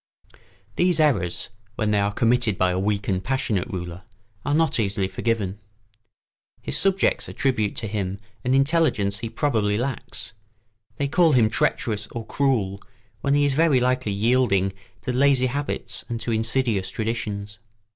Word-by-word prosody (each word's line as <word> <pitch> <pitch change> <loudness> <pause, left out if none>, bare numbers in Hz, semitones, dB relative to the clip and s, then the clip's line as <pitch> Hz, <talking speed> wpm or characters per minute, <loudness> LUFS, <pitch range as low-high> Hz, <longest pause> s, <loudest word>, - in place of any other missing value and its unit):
] 100 +2 -32
These 180 -2 +3
errors, 120 - +1 0.2
when 110 -1 0
they 105 - +3
are 100 0 +1
committed 115 -2 +2
by 90 0 +2
a 90 - -1
weak 100 +1 -1
and 95 -2 0
passionate 115 -6 -1
ruler, 90 -1 -6 0.4
are 145 - +1
not 160 -5 +2
easily 100 -2 +1
forgiven. 100 0 -2 1.0
His - - -4
subjects 195 -1 +2
attribute 120 -7 0
to 110 - -2
him 100 -2 -3 0.3
an 125 +1 +2
intelligence 135 -9 +2
he 115 - -4
probably 110 -7 0
lacks; 125 -1 -4 0.6
they 140 - -1
call 165 +2 +4
him 115 -4 +4
treacherous 105 -1 0
or 115 0 -6
cruel 110 -9 0 0.4
when 140 0 +1
he 145 0 +3
is 140 - +2
very 155 -2 +4
likely 125 -3 +1
yielding 100 -3 +2 0.3
to 125 - -2
lazy 135 0 +4
habits 140 +3 -3
and 115 -1 -3
to 120 - -2
insidious 110 -3 +1
traditions. 105 -2 -4
115 Hz, 155 wpm, -24 LUFS, 100-135 Hz, 1.0 s, call